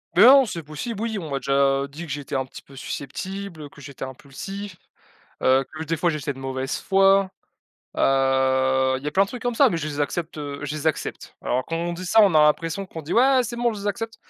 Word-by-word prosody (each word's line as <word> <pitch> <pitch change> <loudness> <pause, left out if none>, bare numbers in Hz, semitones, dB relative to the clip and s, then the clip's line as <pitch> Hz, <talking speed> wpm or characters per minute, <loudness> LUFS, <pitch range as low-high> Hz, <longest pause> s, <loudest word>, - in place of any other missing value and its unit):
Beh 195 - +7
non, 270 +1 +8
c'est 170 -6 -5
possible, 195 +9 -6
oui, 220 -3 -2
on 160 -5 -7
m'a 140 - -1
déjà 135 +1 +2
dit 150 +5 -9
que 160 - -8
j'étais 145 0 -6
un 135 -1 +1
petit - - -12
peu 135 - -16
susceptible, 160 +4 -6
que 145 - -17
j'étais 140 -1 -9
impulsif, 185 +10 -8 0.7
heu, 130 +1 +3
que 155 - -5
des 165 +1 -2
fois, 175 - +2
j'étais 150 -2 -2
de 135 - -10
mauvaise 135 +1 -3
foi, 195 0 +3 0.7
heu, 130 0 +2
il 130 - -11
y - - -4
a - - -1
plein 195 +5 +3
de - - -13
trucs 245 +1 -8
comme 245 -1 0
ça, 270 +2 +5
mais 170 - -1
je 155 - -4
les 145 -1 -5
accepte, 155 +2 -3
heu, 145 -1 -5
je 150 - -4
les 155 +1 -2
accepte. 155 - -3
Alors 125 +1 0
quand 165 - -3
on 170 +1 -2
dit 180 - -7
ça, 220 +5 +5
on 195 - +4
a 155 - +6
l'impression 165 +5 +1
qu'on 160 -3 -8
dit: 155 - -4
«Ouais, 260 +2 +5
c'est 235 +1 -5
bon, 240 -1 +1
je 205 - -7
les - - -7
accepte». 225 +2 -3
155 Hz, 250 wpm, -23 LUFS, 135-195 Hz, 0.7 s, non